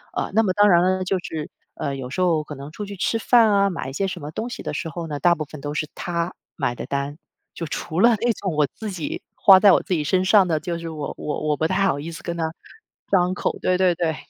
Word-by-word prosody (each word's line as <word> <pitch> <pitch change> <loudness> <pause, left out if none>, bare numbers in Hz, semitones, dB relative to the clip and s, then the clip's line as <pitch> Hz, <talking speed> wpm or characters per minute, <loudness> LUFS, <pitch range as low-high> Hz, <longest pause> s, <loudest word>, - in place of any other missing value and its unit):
呃， - - -2
那 225 +2 +4
么 185 -3 +1
当 205 +1 +5
然 175 -2 +6
了， 185 +1 +1
就 185 +1 0
是， 160 -3 -6 0.3
呃， 140 - -3
有 125 -1 -6
时 185 - -3
候 165 -4 +2
可 150 - -7
能 140 +2 -9
出 205 +5 -6
去 200 0 -8
吃 225 +5 0
饭 225 -2 +5
啊， 200 0 +3
买 165 -7 -4
一 - - -8
些 195 +6 -1
什 175 -3 -6
么 150 +1 -6
东 230 +9 -4
西 - - -7
的 - - -4
时 165 - -3
候 170 +2 -5
呢， 145 -2 -4
大 175 +1 +4
部 155 - -3
分 150 0 -11
都 145 +1 -4
是 150 0 -2
他 170 0 -2 0.2
买 130 -5 -1
的 - - -6
单。 140 +2 -3 0.4
就 165 - -5
除 160 +3 -4
了 235 +4 +6
那 240 0 +3
种 190 -6 -4
我 150 -1 +3
自 220 - -5
己 170 -5 -4
花 190 -1 +7
在 200 -1 +7
我 - - +4
自 185 - -2
己 155 -3 0
身 185 +4 +2
上 195 -1 +5
的， 160 -3 +1
就 170 +1 -3
是 165 - -6
我 155 -2 -5
我 150 - -4
我 150 - +1
不 160 - +1
太 195 +2 +1
好 140 - 0
意 160 +3 -6
思 165 - -9
跟 170 -1 -4
他 160 -1 -1 0.6
张 180 -2 +3
口， - - -2
对 185 - +2
对 185 -1 +3
对。 165 -3 -1
170 Hz, 300 characters per minute, -23 LUFS, 150-190 Hz, 0.6 s, 花